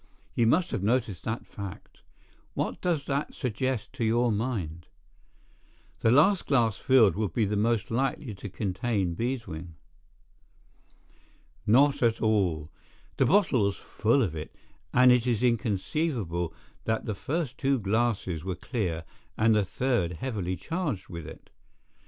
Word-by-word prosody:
You 115 - +2
must 175 +9 +3
have - - -2
noticed 110 -3 0
that 110 +1 -3
fact. 100 -3 -9 0.5
What - - -2
does 165 -6 0
that 140 +2 -2
suggest 125 -1 -2
to 130 -3 -3
your 120 +2 +3
mind?" 100 -8 -3 1.1
"The 115 - +3
last 165 - +4
glass 115 -7 +2
filled 120 - +5
would 105 -4 -2
be 110 - +2
most 105 +3 0
likely 130 0 -1
to 100 +1 -8
contain 95 -1 -1
beeswing." 90 -7 -4 1.9
"Not 140 +6 +5
at 115 -2 +2
all. 90 -9 +1 0.5
The - - +3
bottle 170 - +4
was 100 -1 0
full 115 +5 +1
of 85 -7 -2
it, 75 - -7 0.4
and 125 0 +6
it 125 0 +3
is 120 -1 +1
inconceivable 110 - 0 0.3
that 110 0 -1
the 110 - -2
first 140 - -3
two 135 -1 +2
glasses 105 -6 0
were 95 -1 -3
clear 85 -6 -3 0.3
and 110 +1 +4
the 105 -1 +3
third 115 -4 0
heavily 95 -3 -3
charged 160 - -3
with 85 -3 -7
it. 80 - -12
115 Hz, 140 wpm, -28 LUFS, 95-130 Hz, 1.9 s, and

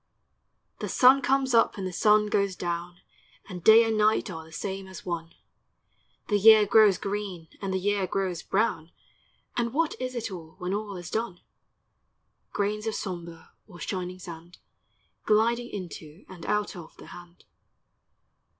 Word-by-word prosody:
The - - -4
sun 260 +2 +6
comes 265 -1 +1
up 230 -2 +3
and 195 - -4
the 185 - -4
sun 210 +2 +4
goes 200 -2 0
down, 175 0 -4 0.5
And 180 -2 -8
day 220 +1 +8
and 225 -1 0
night 215 -1 +2
are 160 -2 -7
the 160 - -16
same 190 +3 -5
as 190 - -11
one; 170 -2 -5 0.9
The 205 -1 +2
year 215 0 +8
grows 205 -2 +5
green, 195 -5 -5
and 195 -1 -3
the 190 - 0
year 200 0 0
grows 185 -4 -2
brown. 190 -6 -1 0.7
And 235 -1 -1
what 320 +2 +1
is 255 0 -4
it 230 -3 -4
all, 165 -3 -9
when 180 0 -3
all 205 -2 -4
is 175 -1 -8
done? 220 -6 -3 1.1
Grains 210 +2 -2
of 220 - -1
sombre 170 -4 -7 0.2
or 175 -5 -13
shining 185 +1 -4
sand, 170 -1 -11 0.7
Gliding 235 +3 +2
into 170 -3 -9
and 180 -3 -10
out 210 -1 -1
of 170 -3 -11
the - - -12
hand. 175 0 -14
195 Hz, 160 wpm, -27 LUFS, 175-215 Hz, 1.1 s, day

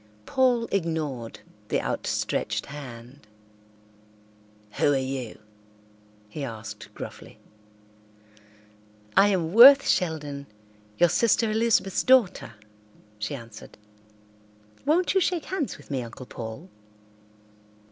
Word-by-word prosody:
Paul 250 -3 +2
ignored 155 -10 -3 0.3
the - - 0
outstretched - - -2
hand. 130 -3 -11 1.5
"Who 145 - +4
are - - +2
you?" 130 -3 -4 0.9
he 140 +7 -7
asked 110 -4 -8
gruffly. - - -9 1.8
"I 200 - +6
am 180 -4 0
Worth 275 +5 +9
Sheldon, 150 -5 -1 0.5
your 175 - +5
sister 225 +4 +2
Elizabeth's 220 -4 +1
daughter," 230 - +3 0.7
she 105 +6 -3
answered. 115 -4 -12 1.1
"Won't 345 +5 +2
you 385 - +3
shake 350 -2 -1
hands 350 -8 -3
with - - -15
me, 135 -2 -1
Uncle 120 +2 -9
Paul?" 115 +8 -8
155 Hz, 95 wpm, -26 LUFS, -, 1.8 s, Worth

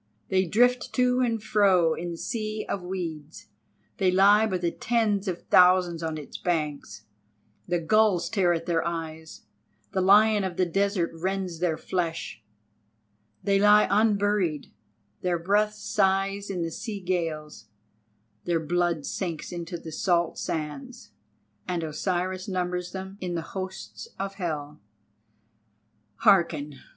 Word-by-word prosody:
They 190 -1 +2
drift 245 +7 +2
to 250 0 +2
and 230 -4 0
fro 195 -6 +3
in 175 +2 -5
the 170 - -6
Sea 215 +1 -3
of 195 - -3
Weeds—they 175 +1 -5
lie 200 +4 +5
by 185 - -1
tens 205 +3 0
of 180 -2 -3
thousands 180 -2 +5
on 160 -1 -3
its 150 - -8
banks; 150 -10 -3 0.6
the 175 0 0
gulls 180 0 +3
tear 175 -5 +2
their 165 0 -1
eyes, 160 -1 -6 0.5
the 190 - 0
lion 210 +2 +5
of 185 -2 -4
the 185 - +3
desert 195 0 0
rends 185 0 -3
their 170 -3 0
flesh; 165 - -3 1.0
they 200 -1 +2
lie 210 +1 +6
unburied, 205 -6 +1 0.5
their 180 -1 0
breath 205 +5 +1
sighs 200 -1 0
in 180 -3 -2
the 165 - -3
sea 215 +3 -5
gales, 165 - -3 0.8
their 170 -1 +1
blood 170 -1 0
sinks 170 -5 -4
into 175 0 -5
the 165 -1 -9
salt 170 +1 0
sands, 165 - -5 0.6
and 175 -2 -2
Osiris 180 +4 -2
numbers 180 -1 -2
them 190 +1 -7
in 180 -2 -3
the 165 - -2
hosts 190 - -6
of 195 0 -4
hell. 150 - -5 1.3
Hearken! 160 - +2
180 Hz, 130 wpm, -26 LUFS, 165-200 Hz, 1.3 s, lie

